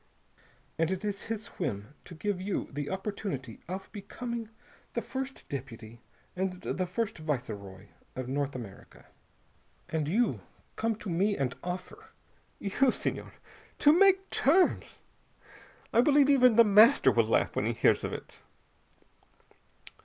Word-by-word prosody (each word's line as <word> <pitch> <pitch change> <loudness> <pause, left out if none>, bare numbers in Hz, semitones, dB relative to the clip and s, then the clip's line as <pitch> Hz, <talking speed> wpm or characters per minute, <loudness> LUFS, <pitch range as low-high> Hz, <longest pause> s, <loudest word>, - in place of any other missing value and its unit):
And 165 0 +2
it 190 +2 -3
is 205 -1 -3
his 220 -1 -4
whim 115 - -3
to 175 - -10
give 195 +2 -2
you 195 +1 -2
the 145 +1 -4
opportunity 190 - -4
of 190 +2 -5
becoming 230 +2 -6 0.4
the - - -1
first 265 0 -6
deputy 120 -4 -8 0.3
and 185 0 -1
the 185 0 -3
first 200 0 -3
viceroy 105 -10 -4 0.3
of 130 -1 -4
North 140 +1 -2
America. 110 -6 -10 0.8
And 155 -2 -1
you 225 +9 +1 0.3
come 225 0 0
to 210 -1 -7
me 195 +5 +1
and 130 -2 -1
offer 180 +1 -6 0.5
you, 230 +7 +2
Senhor! - - -3 0.5
to 295 - +6
make 385 +2 +5
terms! 345 +8 +2 0.9
I 235 - +6
believe 285 +1 +5
even 250 -4 +6
The 235 - +8
Master 215 +5 +6
will - - +3
laugh - - +1
when - - 0
he - - 0
hears - - +3
of - - -2
it." - - -8
190 Hz, 140 wpm, -30 LUFS, 140-230 Hz, 0.9 s, The